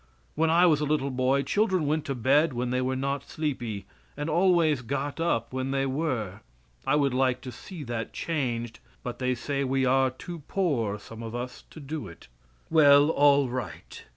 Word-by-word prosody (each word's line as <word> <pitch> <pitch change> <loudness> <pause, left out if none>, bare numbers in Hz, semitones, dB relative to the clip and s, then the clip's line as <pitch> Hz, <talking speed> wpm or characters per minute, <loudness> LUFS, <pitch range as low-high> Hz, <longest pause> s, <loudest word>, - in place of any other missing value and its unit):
When 160 +1 +1
I 170 +2 +5
was 155 -4 +4
a - - +1
little 145 -2 0
boy 130 +2 +1
children 190 - +1
went 155 +1 0
to 135 - -2
bed 140 +5 +3
when 120 0 -2
they 125 0 +1
were 130 +1 -1
not 140 +2 -3
sleepy, 120 -9 -3 0.3
and 150 +2 -2
always 170 -5 +3
got 140 +5 -3
up 115 -9 0
when 130 0 -2
they 135 0 0
were. 130 - -2 0.5
I 135 - +3
would 140 -3 +2
like 130 -1 +2
to 125 - -7
see 160 - -9
that 115 -3 -4
changed, 120 -8 -3 0.2
but 125 - -5
they 125 -1 0
say 140 +3 -2
we 135 0 +1
are 130 +1 +3
too 165 +7 -8
poor, 125 - 0
some 115 +2 -11
of 115 0 -6
us, 125 +1 -6
to - - -11
do 145 -4 -5
it. 85 - -13 0.4
Well, 145 -1 +6
all 145 -2 +4
right. 125 -3 -6
135 Hz, 190 wpm, -27 LUFS, 125-150 Hz, 0.5 s, Well